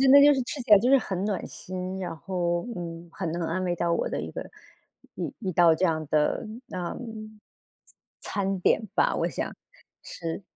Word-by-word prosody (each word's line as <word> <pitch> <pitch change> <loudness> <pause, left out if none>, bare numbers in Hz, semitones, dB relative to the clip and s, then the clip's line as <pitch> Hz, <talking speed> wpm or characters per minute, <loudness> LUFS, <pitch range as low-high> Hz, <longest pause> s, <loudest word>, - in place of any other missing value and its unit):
真 265 -1 +5
的 280 - +10
就 290 +1 +8
是 265 - 0
吃 270 +3 -4
起 235 - -13
来 205 - +10
就 245 +5 +2
是 275 - +8
很 190 -4 -3
暖 205 -3 -1
心， 185 +1 -5
然 180 -3 -4
后， 175 +1 -1
嗯， 170 0 -6
很 170 -4 -3
能 170 0 -2
安 175 +3 -1
慰 175 -1 0
到 170 0 0
我 - - 0
的 - - -2
一 - - -5
个 - - -6 0.7
一 - - -4
一 190 -4 -2
道 165 -1 +6
这 185 - 0
样 155 -3 +1
的 155 +8 +2 0.2
那 175 -1 -4 1.2
餐 195 -1 -1
点 215 - +4
吧， - - +3
我 - - +1
想 - - -4 0.5
吃。 165 +3 -5
185 Hz, 210 characters per minute, -27 LUFS, 170-200 Hz, 1.2 s, 的